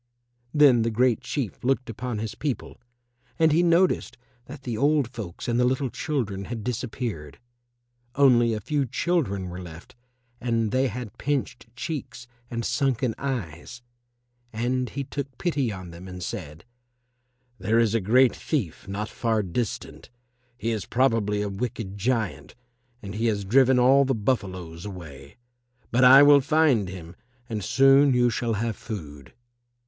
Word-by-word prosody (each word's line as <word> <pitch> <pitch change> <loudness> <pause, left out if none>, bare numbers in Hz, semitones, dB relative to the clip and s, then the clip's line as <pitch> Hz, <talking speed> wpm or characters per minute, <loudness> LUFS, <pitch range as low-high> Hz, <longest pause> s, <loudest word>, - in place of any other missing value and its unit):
Then 140 -6 +5
the 115 - +1
Great 120 +1 +2
Chief 130 -8 -4
looked 130 0 0
upon 115 +1 -4
his 110 0 -4
people 145 -4 -5 0.6
and 160 -1 +4
he 160 +3 +4
noticed 175 +1 +2 0.3
that 135 +1 -11
the 120 -3 -3
old 145 +2 +2
folks 110 -8 -8
and 120 0 +1
the - - +4
little 130 0 0
children 105 -11 -3
had 115 -1 -6
disappeared; 110 - -4 0.8
only 125 -4 +5
a - - -3
few 140 +5 -1
children 120 - -1
were 90 +1 -7
left 85 -1 -11 0.5
and 115 -3 0
they 130 +3 +2
had 120 -2 -7
pinched 135 -4 -2
cheeks 140 -4 -5 0.2
and 115 -1 -3
sunken 125 -2 0
eyes. 120 - -5 0.7
And 125 +3 -1
he 140 - -4
took 135 -1 -6
pity 145 -9 0
on 95 -3 -8
them 85 +3 -11
and 90 -1 -7
said, 85 -5 -7 0.9
"There 110 +1 +1
is 115 -2 +3
a 115 - +1
great 125 +6 +4
thief 110 - -3
not 100 +2 -3
far 110 -2 -1
distant. 100 +4 -4 0.5
He 115 0 -2
is 105 -4 -3
probably 115 -5 +1
a - - -2
wicked 100 -1 -4
giant, 110 -1 -2 0.5
and 100 -1 -6
he 110 +2 -1
has 100 -3 -1
driven 130 +4 +4
all 130 +3 +5
the 135 -1 0
buffaloes 95 -8 -3
away. 75 - -10 0.5
But 120 +2 +3
I 135 +3 +9
will 145 -1 +7
find 135 - +2
him 90 -2 -9 0.3
and 110 -4 -4
soon 135 +3 +5
you 120 -1 +3
shall 115 0 -1
have 110 +1 -2
food." 75 - -9
115 Hz, 155 wpm, -25 LUFS, 100-130 Hz, 0.9 s, I